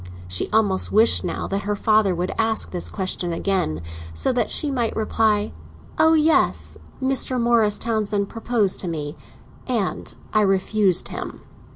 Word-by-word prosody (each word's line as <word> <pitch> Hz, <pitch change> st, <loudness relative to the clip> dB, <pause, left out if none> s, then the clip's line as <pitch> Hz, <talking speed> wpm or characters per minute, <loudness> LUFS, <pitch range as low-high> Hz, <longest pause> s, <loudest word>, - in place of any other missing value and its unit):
She 90 Hz, 0 st, 0 dB
almost 205 Hz, -3 st, +2 dB
wished, 220 Hz, +2 st, +5 dB
now, 175 Hz, -, -3 dB
that 195 Hz, +1 st, -3 dB
her 205 Hz, 0 st, -2 dB
father 215 Hz, -2 st, +2 dB
would 180 Hz, +2 st, -2 dB
ask 225 Hz, -3 st, 0 dB
his 175 Hz, -, -1 dB
question 185 Hz, -3 st, -3 dB
again, 165 Hz, -, -1 dB, 0.3 s
so 170 Hz, -, +1 dB
that 240 Hz, -3 st, 0 dB
she 295 Hz, -2 st, +2 dB
might 240 Hz, -4 st, -1 dB
reply: 215 Hz, -1 st, 0 dB, 0.5 s
"Oh 320 Hz, 0 st, +5 dB
yes, 90 Hz, -, +2 dB, 0.2 s
Mr. 260 Hz, -1 st, +1 dB
Morris 230 Hz, -3 st, +2 dB
Townsend 210 Hz, -3 st, -1 dB
proposed 225 Hz, -3 st, -1 dB
to 185 Hz, -, -3 dB
me, 150 Hz, -3 st, -4 dB, 0.5 s
and 210 Hz, -, -2 dB, 0.2 s
I 215 Hz, -, +3 dB
refused 195 Hz, -1 st, +2 dB
him!" -, -, -7 dB
210 Hz, 150 wpm, -22 LUFS, 185-225 Hz, 0.5 s, wished